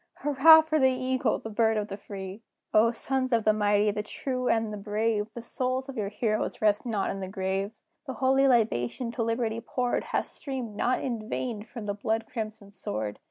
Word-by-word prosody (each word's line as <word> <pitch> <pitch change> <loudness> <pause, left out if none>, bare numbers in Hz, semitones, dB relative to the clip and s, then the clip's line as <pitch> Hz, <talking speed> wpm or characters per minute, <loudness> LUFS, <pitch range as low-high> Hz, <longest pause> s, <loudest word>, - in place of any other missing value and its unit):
Hurrah 295 +3 +8
for 315 0 0
the 265 -1 +5
Eagle, 255 0 0
the 225 - -8
Bird 220 0 +2
of 210 -1 -1
the 195 - -5
Free! 195 0 -8 0.3
O, 225 +2 +5
sons 260 +2 -1
of 230 -2 +3
the 215 - +4
mighty, 205 0 +3
the 210 - -2
true, 255 +4 -3
and 225 -1 +1
the - - -4
brave! 210 +1 0
The 235 - -6
souls 255 +2 -2
of 270 - -6
your 210 -4 -2
heroes 215 +1 -1
rest 210 +3 +2
not 210 -4 0
in 195 - -5
the 190 - -4
grave: 190 +1 -2 0.4
The 265 - -3
holy 270 +1 +3
libation 230 - +1
to 240 - -3
Liberty 230 0 -1
poured, 245 0 -1
Hath - - -1
streamed, 255 -7 -6
not 250 +4 +1
in 230 -4 -3
vain, 235 -5 -3
from 225 0 -8
the 205 - -1
blood 220 +2 -1
crimsoned 215 -4 -6
sword. 105 - -4
225 Hz, 205 wpm, -28 LUFS, 205-255 Hz, 0.4 s, Hurrah